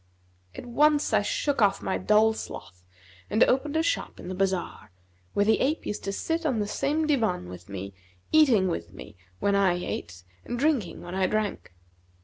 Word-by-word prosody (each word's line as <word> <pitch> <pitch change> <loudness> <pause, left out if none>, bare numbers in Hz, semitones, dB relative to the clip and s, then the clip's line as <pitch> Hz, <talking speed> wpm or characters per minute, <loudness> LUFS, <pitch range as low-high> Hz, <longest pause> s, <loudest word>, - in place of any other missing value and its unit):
At - - -8
once 295 +4 +2
I - - +4
shook 295 - -1
off 200 -1 +3
my - - -1
dull 215 +3 +4
sloth, 90 - -9 0.5
and 215 +3 +4
opened 285 +4 +1
a 320 - +2
shop - - -2
in - - -8
the - - -3
bazar, 190 -1 -2 0.5
where 205 - +3
the 220 +1 +3
ape 300 +5 0
used 210 - -4
to 195 - -1
sit 325 +11 -2
on 275 -7 0
the 210 - 0
same 300 +8 0
divan 225 - 0
with 90 0 -11
me 100 0 -6 0.4
eating 255 -12 +5
with 85 - -4
me 105 +2 -11 0.2
when 200 - +1
I 195 -3 +3
ate 90 - -5 0.2
and 240 - -4
drinking 250 - 0
when 175 +1 -8
I 190 0 +1
drank. 210 - -3
210 Hz, 185 wpm, -27 LUFS, 180-285 Hz, 0.5 s, eating